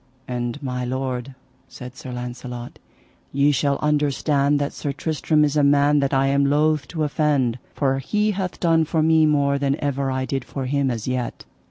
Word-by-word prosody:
And 120 Hz, +3 st, -4 dB
my 125 Hz, -1 st, -3 dB
lord, 130 Hz, 0 st, -3 dB, 0.3 s
said 125 Hz, -1 st, -10 dB
Sir 130 Hz, -, -8 dB
Launcelot, 125 Hz, 0 st, -7 dB, 0.5 s
ye 140 Hz, +2 st, +3 dB
shall 140 Hz, 0 st, +1 dB
understand 145 Hz, -1 st, +2 dB
that 145 Hz, 0 st, -2 dB
Sir 145 Hz, -, -3 dB
Tristram 155 Hz, +1 st, 0 dB
is 145 Hz, 0 st, -1 dB
a 150 Hz, -, +4 dB
man 145 Hz, +1 st, +4 dB
that 140 Hz, -1 st, 0 dB
I 135 Hz, -1 st, +2 dB
am 140 Hz, 0 st, +2 dB
loath 150 Hz, 0 st, +2 dB
to 160 Hz, -3 st, -3 dB
offend, 145 Hz, -5 st, +1 dB, 0.2 s
for 135 Hz, -2 st, +1 dB
he 210 Hz, +10 st, 0 dB
hath 190 Hz, -2 st, -4 dB
done 165 Hz, -2 st, +3 dB
for 160 Hz, 0 st, 0 dB
me 160 Hz, 0 st, +4 dB
more 140 Hz, -2 st, +2 dB
than 140 Hz, 0 st, +1 dB
ever 140 Hz, -1 st, -1 dB
I 130 Hz, 0 st, -1 dB
did 135 Hz, -1 st, -2 dB
for 135 Hz, +1 st, -5 dB
him 140 Hz, +1 st, 0 dB
as 115 Hz, -3 st, -4 dB
yet. 125 Hz, -2 st, -3 dB
140 Hz, 185 wpm, -22 LUFS, 130-150 Hz, 0.5 s, a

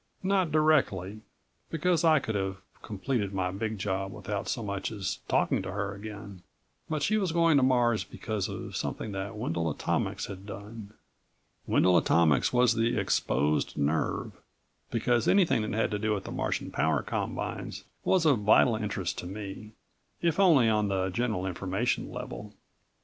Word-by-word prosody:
Not 190 Hz, -3 st, +2 dB
directly, 110 Hz, -, +2 dB, 0.5 s
because 170 Hz, +2 st, +1 dB
I 160 Hz, -2 st, +6 dB
could 115 Hz, -5 st, -2 dB
have 95 Hz, -1 st, -2 dB, 0.2 s
completed 105 Hz, -1 st, -2 dB
my 90 Hz, -1 st, 0 dB
big 110 Hz, +3 st, -3 dB
job 95 Hz, 0 st, -2 dB
without 100 Hz, 0 st, -4 dB
so 115 Hz, -, -2 dB
much 100 Hz, 0 st, -3 dB
as 100 Hz, -4 st, -3 dB
talking -, -, +2 dB
to 95 Hz, 0 st, -5 dB
her 100 Hz, 0 st, -2 dB
again. 100 Hz, -2 st, -9 dB, 0.5 s
But 155 Hz, -2 st, -1 dB
she 215 Hz, -, +2 dB
was 190 Hz, -4 st, 0 dB
going 165 Hz, -2 st, +4 dB
to -, -, +4 dB
Mars 120 Hz, -3 st, +3 dB
because 110 Hz, -4 st, -4 dB
of -, -, -6 dB
something 110 Hz, -, -3 dB
that 95 Hz, +1 st, -4 dB
Wendel 85 Hz, -5 st, -1 dB
Atomics 75 Hz, -, -1 dB
had 95 Hz, +1 st, -9 dB
done. 105 Hz, +1 st, -9 dB, 0.7 s
Wendel 90 Hz, -1 st, +4 dB
Atomics 80 Hz, -3 st, +3 dB
was 125 Hz, -1 st, +4 dB
the 115 Hz, 0 st, +1 dB
exposed 75 Hz, -6 st, 0 dB
nerve, 75 Hz, +3 st, 0 dB, 0.6 s
because 120 Hz, 0 st, +1 dB
anything 185 Hz, -, +4 dB
that 105 Hz, -, -3 dB
had 110 Hz, +1 st, 0 dB
to 105 Hz, -, -1 dB
do 110 Hz, 0 st, +1 dB
with 100 Hz, -, -4 dB
the -, -, -7 dB
Martian -, -, -2 dB
power -, -, +1 dB
combines -, -, -4 dB, 0.2 s
was 185 Hz, -3 st, +2 dB
of 140 Hz, -7 st, +4 dB
vital 110 Hz, +3 st, +5 dB
interest 100 Hz, -4 st, -3 dB
to 90 Hz, -, -6 dB
me, 105 Hz, +2 st, -7 dB, 0.5 s
if 170 Hz, +1 st, 0 dB
only 160 Hz, -11 st, +6 dB
on 105 Hz, -1 st, +2 dB
the 95 Hz, -1 st, 0 dB
general 110 Hz, -3 st, -1 dB
information 95 Hz, +6 st, -1 dB
level. 125 Hz, -4 st, -7 dB
105 Hz, 160 wpm, -29 LUFS, 95-125 Hz, 0.7 s, I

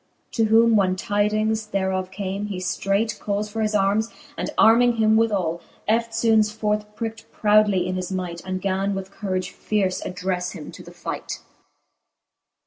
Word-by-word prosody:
To 225 Hz, -, +2 dB
whom 225 Hz, +1 st, +5 dB
when 190 Hz, -3 st, +3 dB
tydings 215 Hz, +2 st, 0 dB
thereof 190 Hz, -2 st, -1 dB
came, 195 Hz, +1 st, -4 dB
he 200 Hz, -3 st, -4 dB
ftreight 195 Hz, +4 st, -1 dB
Cals 210 Hz, +1 st, -2 dB
for 225 Hz, +1 st, -3 dB
his 215 Hz, -1 st, 0 dB
armes, 205 Hz, +3 st, +2 dB, 0.3 s
and -, -, -3 dB
arming 235 Hz, +2 st, +6 dB
him 220 Hz, -1 st, +3 dB
withall, 195 Hz, -7 st, +1 dB, 0.3 s
Eftfoones 225 Hz, -1 st, +2 dB
forth 210 Hz, -1 st, -2 dB
pricked 225 Hz, 0 st, -6 dB
proudly 210 Hz, -3 st, +3 dB
in 185 Hz, -, -2 dB
his 185 Hz, 0 st, -3 dB
might, 180 Hz, -2 st, -3 dB
And 185 Hz, 0 st, -3 dB
gan 195 Hz, +1 st, 0 dB
with 195 Hz, 0 st, -5 dB
courage 185 Hz, -3 st, -3 dB
fierce 195 Hz, -3 st, -1 dB
addrefle 180 Hz, -1 st, -3 dB
him 150 Hz, -, -8 dB
to -, -, -11 dB
the -, -, -12 dB
fight. -, -, -5 dB
205 Hz, 155 wpm, -23 LUFS, 185-220 Hz, 0.3 s, arming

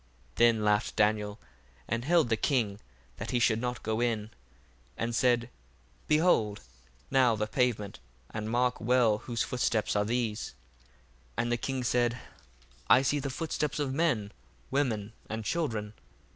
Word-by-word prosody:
1:19 -, -, -34 dB
Then 115 Hz, -2 st, +4 dB
laughed 105 Hz, 0 st, +1 dB
Daniel, 105 Hz, 0 st, +1 dB, 0.5 s
and 115 Hz, +2 st, -1 dB
held 165 Hz, -5 st, +3 dB
the 115 Hz, -, +3 dB
king 110 Hz, -4 st, 0 dB, 0.4 s
that -, -, -5 dB
he 125 Hz, -, +1 dB
should 115 Hz, -1 st, +2 dB
not 125 Hz, -2 st, -3 dB
go 110 Hz, +1 st, -1 dB
in, 110 Hz, -3 st, -1 dB, 0.7 s
and 115 Hz, +1 st, -2 dB
said, 120 Hz, -1 st, +2 dB, 0.6 s
Behold 150 Hz, -, +3 dB, 0.5 s
now 130 Hz, -4 st, +4 dB
the 105 Hz, 0 st, -1 dB
pavement, 110 Hz, -3 st, -1 dB, 0.3 s
and 110 Hz, 0 st, -4 dB
mark 125 Hz, +2 st, +1 dB
well 115 Hz, -3 st, +3 dB
whose 120 Hz, 0 st, -2 dB
footsteps 115 Hz, -4 st, 0 dB
are 105 Hz, -, +3 dB
these. 110 Hz, -, -2 dB, 0.8 s
1:20 -, -, +3 dB
And 120 Hz, -, -2 dB
the 120 Hz, -, +2 dB
king 130 Hz, +1 st, -3 dB
said, 120 Hz, 0 st, +1 dB, 0.7 s
I 130 Hz, -, +7 dB
see 145 Hz, +2 st, +1 dB
the 140 Hz, 0 st, -3 dB
footsteps 150 Hz, +1 st, -2 dB
of 140 Hz, -3 st, -1 dB
men, 135 Hz, -10 st, +1 dB, 0.4 s
women, 115 Hz, -7 st, 0 dB, 0.2 s
and 110 Hz, 0 st, -4 dB
children. 110 Hz, -7 st, -2 dB
120 Hz, 150 wpm, -30 LUFS, 110-125 Hz, 0.8 s, I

